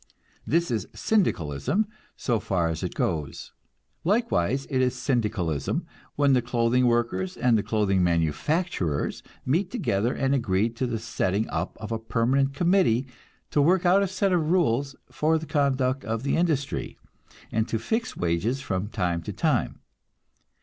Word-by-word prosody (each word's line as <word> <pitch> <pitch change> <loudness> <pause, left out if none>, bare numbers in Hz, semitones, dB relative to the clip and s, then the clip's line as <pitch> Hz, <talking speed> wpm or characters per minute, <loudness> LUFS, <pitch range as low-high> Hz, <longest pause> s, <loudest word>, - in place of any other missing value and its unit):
This 170 -2 +1
is 110 -4 -1
Syndicalism 175 - +1 0.3
so 120 -4 0
far 85 -5 0
as 80 - -3
it - - -4
goes. 75 -3 -2 0.5
Likewise 140 - +1
it 130 -2 0
is 125 -1 +1
Syndicalism 105 - -1 0.3
when 140 -1 +3
the 125 - +4
clothing 120 +1 +2
workers 120 +11 0
and 125 -2 +3
the 105 - +3
clothing 100 -4 +1
manufacturers 85 - 0 0.2
meet 170 +9 +1
together 120 - 0
and 135 +1 0
agree 110 -4 +1
to 120 +2 -3
the 120 -1 -2
setting 110 -2 -1
up - - -3
of 110 0 -7
a 115 - -1
permanent 130 +5 +1
committee 170 - +3 0.5
to 145 - +3
work 180 +5 +3
out 185 +3 +5
a 200 - +1
set 190 +1 0
of 160 -3 +1
rules 140 -6 +1 0.2
for 160 +1 +2
the 160 - -5
conduct 135 -3 +1
of 115 +1 -3
the 140 - +1
industry, 155 -5 -1 0.5
and 110 0 0
to 115 - -1
fix 225 - -2
wages 90 +10 0
from 100 -7 -2
time 90 -5 -1
to - - -5
time. - - 0
125 Hz, 155 wpm, -26 LUFS, 105-155 Hz, 0.5 s, out